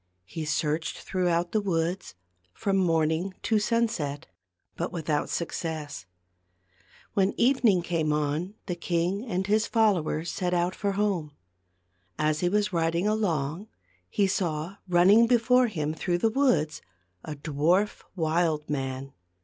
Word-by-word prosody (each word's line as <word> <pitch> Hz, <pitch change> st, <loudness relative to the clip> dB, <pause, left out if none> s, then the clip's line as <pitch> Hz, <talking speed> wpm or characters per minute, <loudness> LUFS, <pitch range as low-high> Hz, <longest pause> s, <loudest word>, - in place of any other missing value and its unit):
He 155 Hz, -, -5 dB
searched 155 Hz, +1 st, -1 dB
throughout 175 Hz, -2 st, 0 dB
the 215 Hz, -, +1 dB
woods, 175 Hz, -, -2 dB, 0.4 s
from 195 Hz, -1 st, 0 dB
morning 165 Hz, +1 st, +1 dB
to 220 Hz, -2 st, +2 dB
sunset, 210 Hz, -11 st, -1 dB, 0.5 s
but 170 Hz, -, -3 dB
without 155 Hz, -3 st, -1 dB
success. 160 Hz, -3 st, -4 dB, 1.1 s
When 195 Hz, 0 st, +2 dB
evening 235 Hz, -8 st, +4 dB
came 165 Hz, -3 st, 0 dB
on 150 Hz, +6 st, -1 dB
the 180 Hz, -, -2 dB
king 175 Hz, +3 st, -1 dB
and 190 Hz, -3 st, -1 dB
his 215 Hz, +2 st, +2 dB
fol 220 Hz, -3 st, +4 dB
lowers 155 Hz, +2 st, -3 dB
set 180 Hz, -1 st, -1 dB
out 175 Hz, +1 st, +1 dB
for 200 Hz, +1 st, -2 dB
home. 195 Hz, -7 st, -1 dB, 0.8 s
As 155 Hz, 0 st, +1 dB
he 175 Hz, -, +1 dB
was 210 Hz, 0 st, 0 dB
riding 170 Hz, +3 st, +1 dB
along 180 Hz, -4 st, -1 dB, 0.4 s
he 200 Hz, -, +2 dB
saw 175 Hz, -1 st, -2 dB
running 190 Hz, +6 st, +6 dB
before 250 Hz, +1 st, +4 dB
him 155 Hz, -8 st, -2 dB
through 175 Hz, +2 st, -1 dB
the 220 Hz, +5 st, +1 dB
woods 230 Hz, -, +1 dB, 0.4 s
a 155 Hz, -, -6 dB
dwarf 160 Hz, +8 st, +1 dB
wild 160 Hz, -2 st, 0 dB
man. 135 Hz, -1 st, -4 dB
175 Hz, 135 wpm, -27 LUFS, 155-205 Hz, 1.1 s, running